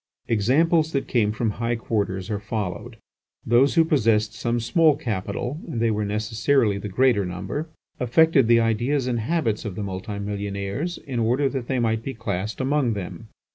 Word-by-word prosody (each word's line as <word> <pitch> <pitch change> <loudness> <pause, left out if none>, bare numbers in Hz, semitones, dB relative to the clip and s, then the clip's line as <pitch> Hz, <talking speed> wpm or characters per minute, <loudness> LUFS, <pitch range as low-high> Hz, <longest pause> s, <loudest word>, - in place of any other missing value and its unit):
Examples 155 - +2
that 140 - -1
come 110 -4 +2
from 110 0 -1
high 115 +2 -1
quarters 105 -3 -2
are 105 - -1
followed. 100 -5 -4 0.5
Those 125 +6 +4
who 165 -1 +5
possessed 110 -8 +2
some 120 +2 -1
small 155 +6 +3
capital 115 +6 -3
(and 130 -9 -4
they 115 -1 +2
were 105 0 -1
necessarily 110 +1 +1
the 105 - -5
greater 120 0 +3
number), 95 - -4 0.3
affected 135 +1 +4
the 115 0 +5
ideas 120 +5 +1
and 120 -2 -1
habits 115 -4 -1
of 105 -4 -5
the 105 - -4
multi 95 +1 -5
millionaires, 100 - -3
in 130 -5 -5
order 125 +5 +2
that 130 -4 -4
they 130 - 0
might 115 -2 +1
be 135 +3 -6
classed 105 -2 -3
among 135 -2 +1
them. 105 +3 -7
115 Hz, 175 wpm, -24 LUFS, 105-135 Hz, 0.5 s, who